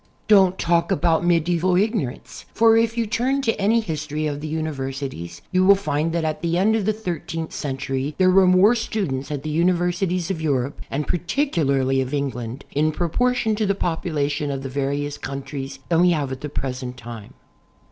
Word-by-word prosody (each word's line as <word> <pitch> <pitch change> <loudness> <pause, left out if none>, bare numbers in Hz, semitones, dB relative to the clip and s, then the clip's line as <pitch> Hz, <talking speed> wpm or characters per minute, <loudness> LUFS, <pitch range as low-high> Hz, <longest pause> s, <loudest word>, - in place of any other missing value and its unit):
Don't 190 -3 +5
talk 170 0 +1
about 165 +2 +2
medieval 175 +1 +2
ignorance, 195 - -2
for 225 0 +5
if 230 +1 +2
you 230 - +1
turn 250 +6 0
to 225 - +2
any 225 +4 +3
history 155 -4 -3
of 145 -1 -3
the 155 - -4
universities 135 - -4
you 185 0 +3
will 200 +1 +7
find 165 -5 -1
that 165 -1 -1
at 155 -1 -2
the 170 0 0
end 210 +4 +3
of 215 -3 0
the - - +4
thirteenth 170 -6 -5
century 135 +1 -3
there 185 -1 +4
were 190 0 +5
more 185 +5 +6
students 190 - -2
at 145 -2 -4
the 155 - -3
universities 175 +2 +1
of 165 -4 -4
Europe 140 -3 -1
and 145 +2 -2
particularly 150 - +1
of 130 +2 -2
England, 125 -3 -4
in 155 +2 +1
pro 170 +2 -2
portion 245 +2 +1
to 210 -1 0
the 200 - +1
population 150 -5 -1
of 135 -1 -3
the 135 - -4
various 140 +2 -2
countries, 135 0 -6
than 165 -1 +3
we 180 - +5
have 145 -6 0
at 130 0 -6
the 150 - -4
present 125 -2 -4
time. 115 -3 -10
160 Hz, 190 wpm, -22 LUFS, 140-185 Hz, -, will